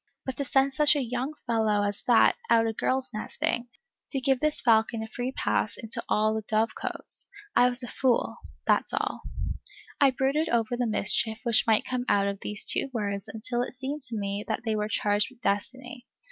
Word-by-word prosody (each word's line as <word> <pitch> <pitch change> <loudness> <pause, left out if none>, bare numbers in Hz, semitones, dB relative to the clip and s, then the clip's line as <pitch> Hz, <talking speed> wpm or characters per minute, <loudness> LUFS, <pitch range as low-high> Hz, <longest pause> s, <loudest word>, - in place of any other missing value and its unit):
But 265 - -3
to 280 - -2
send 270 +1 +2
such 300 +1 +5
a - - +1
young 250 +5 -3
fellow 220 -3 +1
as 205 0 -2
that 240 -2 +5
out 225 0 +5
a 225 - -1
girl's 260 +4 -1
nesting! 235 +2 -2 0.4
to 275 - -2
give 265 0 +2
this 305 +1 +2
falcon 225 -1 +2
a - - -6
free 245 +3 -4
pass 210 -5 -1
into 225 0 -3
all 215 +1 +2
the 220 - -2
dove 220 +2 0
cotes! - - -4 0.3
I 245 - +6
was 245 +1 +2
a - - -4
fool, 255 -2 0 0.3
that's - - +2
all. - - -2 0.8
I 280 - +6
brooded 270 +5 0
over 235 0 +1
the 245 -1 -1
mischief 220 +1 +2
which 235 -2 +3
might 220 -1 +3
come 250 -1 -2
out 200 -1 +3
of 200 -1 -3
these 210 0 -2
two - - +1
words 200 -4 -3
until 240 +2 -2
it 250 - -4
seemed 270 +3 -4
to 230 -2 -4
me 200 0 -3
that - - -2
they 220 -1 0
were 210 0 -2
charged 205 -1 +1
with 255 -1 -21
destiny. 245 +5 -3
235 Hz, 200 wpm, -27 LUFS, 215-255 Hz, 0.8 s, I